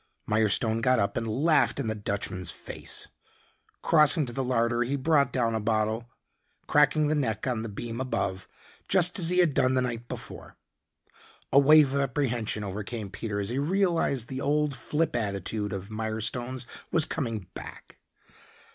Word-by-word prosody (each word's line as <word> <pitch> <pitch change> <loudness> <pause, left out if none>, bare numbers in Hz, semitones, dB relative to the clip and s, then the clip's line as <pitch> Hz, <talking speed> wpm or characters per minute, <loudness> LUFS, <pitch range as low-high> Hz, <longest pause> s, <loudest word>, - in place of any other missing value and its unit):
Mirestone 110 +1 +2
got 130 +1 +3
up 100 -2 0
and 115 0 -2
laughed 145 +6 +2
in 140 - -1
the 110 - -1
Dutchman's 100 -4 -4
face. - - -7 0.7
Crossing 155 -1 +4
to 120 - -7
the 135 - -1
larder, 120 -1 +1
he 125 +4 0
brought 140 +1 +2
down 115 -3 0
a 110 - 0
bottle, 110 +2 -1 0.6
cracking 150 +1 +3
the 155 - +1
neck 115 -8 -1
on 125 -4 -1
the 115 - -5
beam 115 +4 -5
above, 95 -7 -2 0.4
just 180 0 +3
as 170 -2 +3
he 180 - +1
had 175 -5 +4
done 130 0 +2
the 130 - +2
night 120 -1 -4
before. - - -8 1.0
A 140 - +8
wave 145 -1 +6
of 140 - +1
apprehension 120 -6 -1
overcame 105 +1 -5
Peter 105 -1 -4
as 100 0 -2
he 125 +3 -1
realized 165 - +1
the 130 +2 -5
old 150 0 +1
flip 150 +4 -1
attitude 105 -1 -2
of 100 +2 -6
Mirestone's 110 +3 -2 0.3
was 160 -2 +5
coming 115 - -3
back. - - -11
120 Hz, 165 wpm, -27 LUFS, 110-140 Hz, 1.0 s, A